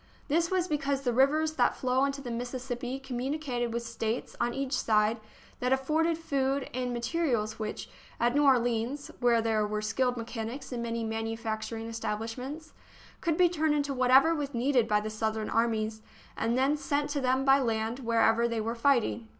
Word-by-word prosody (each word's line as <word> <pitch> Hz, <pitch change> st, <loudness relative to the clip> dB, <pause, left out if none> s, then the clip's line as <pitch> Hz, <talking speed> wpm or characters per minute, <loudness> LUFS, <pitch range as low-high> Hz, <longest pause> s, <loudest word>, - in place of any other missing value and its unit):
This 335 Hz, +3 st, +2 dB
was 370 Hz, -1 st, +1 dB
because 280 Hz, -3 st, -1 dB
the 245 Hz, -2 st, +1 dB
rivers 305 Hz, +5 st, +3 dB
that 245 Hz, -, +3 dB
flow 255 Hz, +1 st, +1 dB
into 275 Hz, 0 st, -3 dB
the 245 Hz, -3 st, -6 dB
Mississippi 245 Hz, +1 st, -4 dB
communicated 260 Hz, -1 st, -3 dB
with 235 Hz, +1 st, -2 dB
States 230 Hz, 0 st, -3 dB
on 240 Hz, 0 st, +1 dB
each 270 Hz, +1 st, -3 dB
side 220 Hz, -2 st, +2 dB, 0.4 s
that 250 Hz, +1 st, 0 dB
afforded 315 Hz, +5 st, +2 dB
food 275 Hz, -4 st, -1 dB
and 250 Hz, 0 st, -2 dB
materials 235 Hz, -4 st, -1 dB
which, 215 Hz, -1 st, -4 dB, 0.3 s
at 240 Hz, +1 st, +2 dB
New 290 Hz, +1 st, +3 dB
Orleans, 245 Hz, +1 st, +1 dB
where 235 Hz, -2 st, +3 dB
there 220 Hz, -2 st, +1 dB
were 210 Hz, 0 st, -2 dB
skilled 250 Hz, +4 st, 0 dB
mechanics 230 Hz, +3 st, -5 dB
and 240 Hz, -2 st, -3 dB
many 230 Hz, 0 st, -2 dB
manufacturing 225 Hz, 0 st, -3 dB
establishments, 230 Hz, +7 st, -5 dB, 0.5 s
could 330 Hz, -2 st, 0 dB
be 360 Hz, -, +6 dB
turned 315 Hz, -3 st, +1 dB
into 285 Hz, -1 st, 0 dB
whatever 260 Hz, +5 st, +5 dB
was 285 Hz, -4 st, -3 dB
needed 245 Hz, -1 st, +2 dB
by 210 Hz, -1 st, +2 dB
the 215 Hz, +1 st, -4 dB
Southern 220 Hz, 0 st, -2 dB
armies, 220 Hz, -1 st, 0 dB, 0.3 s
and 230 Hz, +2 st, 0 dB
then 275 Hz, +3 st, +2 dB
sent 290 Hz, 0 st, -1 dB
to 285 Hz, -1 st, -1 dB
them 260 Hz, +1 st, +1 dB
by 270 Hz, 0 st, +6 dB
land 225 Hz, -1 st, -1 dB
wherever 230 Hz, -1 st, +3 dB
they 230 Hz, -1 st, -2 dB
were 225 Hz, +2 st, -2 dB
fighting. 235 Hz, -2 st, +1 dB
245 Hz, 175 wpm, -29 LUFS, 225-275 Hz, 0.5 s, be